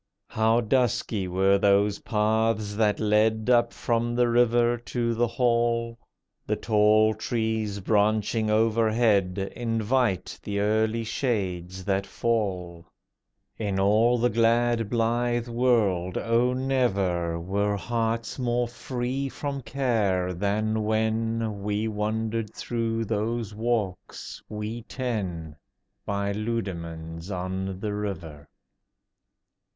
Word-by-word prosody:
How 110 +2 +2
dusky 110 -4 0
were 95 +2 +3
those 100 +1 +3
paths 110 -1 0
that 105 -1 +1
led 110 +2 +2
Up 120 -1 +4
from 120 0 -1
the 120 0 +3
river 120 0 +3
to 120 0 -2
the 120 +1 +1
hall. 115 -1 0 0.5
The - - +1
tall 110 0 +3
trees 110 -2 -2
branching 110 +2 +1
overhead 110 -3 +2 0.2
Invite 115 -2 0
the 100 -1 -3
early 110 +2 +1
shades 95 -7 -2
that 100 -1 0
fall. 90 -7 -2 0.7
In 100 -3 -1
all 110 +5 +4
the 120 +1 +2
glad 115 0 +2
blithe 120 +1 0
world, 110 -7 +1
oh, 115 +2 +2
never 100 -11 0
Were 100 +4 -1
hearts 115 +2 -2
more 120 -1 0
free 130 +2 -3
from 140 0 -4
care 110 -8 0
than 105 +4 0
when 110 0 -1
We 105 +2 -1
wandered 110 +1 -2
through 115 -1 -2
those 110 +1 -2
walks, 110 -4 -3
we 105 +2 -5
ten, 95 - -4 0.5
By 100 0 -1
Leudemanns 85 -6 -4
on 95 0 -3
the 105 0 -3
River. 85 -8 -5
110 Hz, 105 wpm, -26 LUFS, 100-115 Hz, 0.7 s, Up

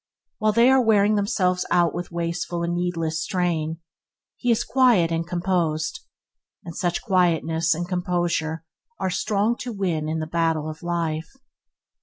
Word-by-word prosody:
While 215 0 +2
they 235 +4 +5
are 265 0 +5
wearing 215 -3 +4
themselves 190 -3 +1
out 175 -1 +3
with 175 0 -5
wasteful 170 0 -3
and 170 0 -1
needless 165 -2 -1
strain, 170 -5 -1 0.6
he 245 - -3
is 230 - +3
quiet 240 -11 +3
and 165 0 -1
composed, 175 - -1 0.7
and 170 -2 -8
such 175 -2 -1
quietness 165 -4 +2
and 175 +2 -4
composure 175 -3 -1 0.3
are 190 -1 -1
strong 210 +4 +1
to 250 - -5
win 175 -7 -2
in 160 - -1
the 155 - -2
battle 165 -1 0
of 155 0 -7
life. 165 -2 -2
175 Hz, 150 wpm, -24 LUFS, 165-195 Hz, 0.7 s, they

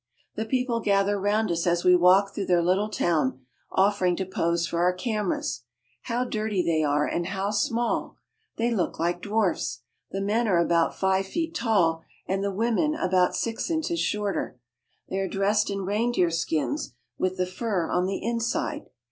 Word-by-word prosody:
The 220 - -3
people 250 0 0
gather 200 -1 +2
round 205 +1 +1
us 170 +1 -1
as 175 0 +2
we 180 0 +6
walk 190 +3 +5
through 200 - -3
their 175 -2 +3
little 190 +5 +1
town, 145 -10 0 0.3
offering 190 -2 +2
to 190 - -3
pose 170 -2 0
for 170 - -3
our 180 +1 +3
cameras. 205 - -2 0.4
How 240 +1 0
dirty 215 -5 -1
they 160 -2 +1
are 150 0 +2
and 170 0 -2
how 195 +1 -2
small! 230 +3 -1 0.4
They 235 +1 +1
look 185 -6 -1
like 175 +1 -1
dwarfs. 195 - -1 0.3
The 195 - -4
men 215 +4 +1
are 185 -4 +3
about 170 -1 +2
five 190 0 +1
feet 325 - -3
tall 190 - +2 0.3
and 195 +1 -1
the 200 - 0
women 235 +9 +1
about 185 - +2
six 230 +6 -2
inches 330 +1 -1
shorter. 205 -10 -2 0.5
They 190 - -3
are 195 - -1
dressed 205 +2 +1
in 195 -1 -3
reindeer 205 -3 +1
skins 165 - -2 0.2
with 185 0 0
the 180 - +1
fur 185 -2 -2
on 180 +1 +1
the 195 - -3
inside. 235 +1 -2
195 Hz, 175 wpm, -26 LUFS, 175-220 Hz, 0.5 s, we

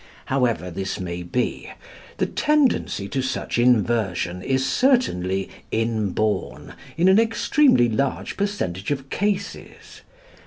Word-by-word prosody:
However 115 - 0
this 95 +2 -4
may 90 -1 -4
be, 105 +9 -2 0.5
the - - +1
tendency 290 - +1
to 135 - -1
such 130 -2 -2
inversion 110 -7 +1
is 130 +4 0
certainly 95 - +1 0.2
inborn 110 -2 -1 0.2
in 175 +3 +3
an 190 +3 +6
extremely 230 - +3
large 125 +5 -2
percentage 150 - -3
of 135 -1 -3
cases. 200 0 -4
120 Hz, 110 wpm, -23 LUFS, -, 0.5 s, an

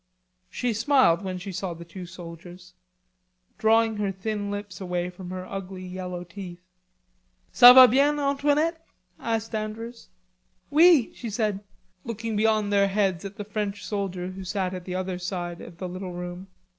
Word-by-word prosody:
She 245 -2 -1
smiled 230 -6 +3
when 185 -2 -4
she 180 +2 -7
saw 185 -1 -4
the 170 +1 -10
two 180 +1 -9
soldiers, 175 0 -11 0.9
drawing 225 0 +3
her 205 -2 -1
thin 205 +1 -4
lips 205 -1 -6
away 180 -1 -2
from 180 0 -10
her 185 0 -5
ugly 190 -1 -7
yellow 180 -1 -6
teeth. 180 0 -10 0.9
"Ca 245 +1 +10
va 255 0 +10
bien, 280 +4 +3
Antoinette?" 295 +4 +1 0.4
asked 225 0 -2
Andrews. 220 +2 -5 0.6
"Oui," 320 -4 +6
she 235 - -6
said, 210 -2 -1 0.4
looking 225 -1 -4
beyond 215 -1 +2
their 200 0 +4
heads 195 -2 0
at 195 0 -7
the 205 - -6
French 210 -1 -4
soldier 190 -3 -3
who 190 +1 -8
sat 190 -1 -2
at 180 -1 -7
the 180 - -4
other 185 -1 -3
side 175 -1 -4
of 170 - -11
the 185 - -5
little 185 0 -6
room. 175 +1 -7
195 Hz, 160 wpm, -26 LUFS, 180-220 Hz, 0.9 s, Ca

